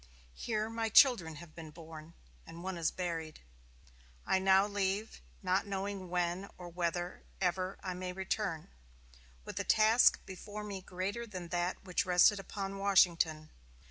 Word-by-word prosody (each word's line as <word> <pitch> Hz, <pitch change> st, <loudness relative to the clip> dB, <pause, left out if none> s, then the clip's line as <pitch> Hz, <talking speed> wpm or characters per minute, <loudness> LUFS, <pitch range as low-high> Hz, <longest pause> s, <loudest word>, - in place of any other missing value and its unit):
Here 215 Hz, -, -2 dB
my 225 Hz, 0 st, -2 dB
children 220 Hz, -, +5 dB
have 155 Hz, +1 st, -11 dB
been 160 Hz, -2 st, -9 dB
born, 160 Hz, 0 st, -11 dB, 0.3 s
and 170 Hz, +1 st, -9 dB
one 190 Hz, 0 st, -3 dB
is 165 Hz, -2 st, +1 dB
buried. 165 Hz, -3 st, -4 dB, 0.9 s
I 190 Hz, -, +2 dB
now 190 Hz, +1 st, +5 dB
leave, 205 Hz, +1 st, -2 dB, 0.2 s
not 185 Hz, +2 st, +1 dB
knowing 195 Hz, -1 st, -4 dB
when 180 Hz, +2 st, -1 dB
or 180 Hz, -1 st, -8 dB
whether 175 Hz, +1 st, -3 dB, 0.2 s
ever 185 Hz, 0 st, -1 dB
I 185 Hz, -2 st, -3 dB
may 180 Hz, 0 st, -4 dB
return, 190 Hz, -3 st, -3 dB, 0.7 s
with -, -, -5 dB
a -, -, 0 dB
task 220 Hz, +2 st, +5 dB
before 205 Hz, +3 st, -7 dB
me 200 Hz, -2 st, -5 dB
greater 190 Hz, +6 st, -4 dB
than 185 Hz, -5 st, -7 dB
that 175 Hz, +1 st, -2 dB
which 180 Hz, -2 st, 0 dB
rested 180 Hz, +3 st, +5 dB
upon 195 Hz, 0 st, -5 dB
Washington. 170 Hz, -5 st, +3 dB
185 Hz, 145 wpm, -33 LUFS, 175-200 Hz, 0.9 s, children